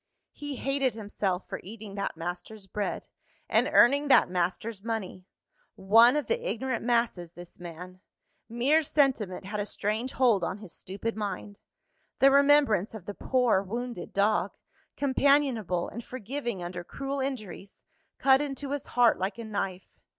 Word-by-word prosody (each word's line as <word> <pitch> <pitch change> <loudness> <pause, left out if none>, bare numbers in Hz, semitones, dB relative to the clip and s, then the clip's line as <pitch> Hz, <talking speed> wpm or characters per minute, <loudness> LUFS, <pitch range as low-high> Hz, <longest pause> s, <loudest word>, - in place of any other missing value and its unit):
He 290 -1 -6
hated 270 -2 0
himself 200 -3 -3
for - - -6
eating 210 +1 -9
that 200 0 -3
master's 180 +5 -6
bread, 200 +1 -3 0.4
and - - +2
earning 280 +4 +5
that 265 - +5
master's 190 +4 -2
money. 200 -5 -4 0.5
One 230 +7 +6
of 300 - 0
the 475 +1 -1
ignorant 255 -1 -2
masses, 230 -8 0
this 175 0 -12
man! 180 +2 -9 0.5
Mere 260 +7 +3
sentiment 265 -12 0
had 210 +2 -4
a 205 - -1
strange 215 +6 -2
hold 235 -8 +3
on 185 - -2
his 205 -4 -11
stupid 200 +4 -5
mind; 205 -1 -5 0.6
the 275 +1 +6
remembrance 280 -8 +4
of 200 -5 -9
the 205 - -5
poor 250 -4 +2
wounded 235 0 -5
dog, 205 +2 +1 0.4
companionable 270 -9 +2
and 235 - -7
forgiving 240 -4 -5
under 175 0 -5
cruel 275 +8 -4
injuries, 215 -8 -6 0.3
cut 270 0 +5
into 280 -1 -4
his 285 -1 -3
heart 240 -5 +5
like 190 +4 -2
a 230 - -6
knife. 195 -3 -5
220 Hz, 150 wpm, -28 LUFS, 195-265 Hz, 0.6 s, One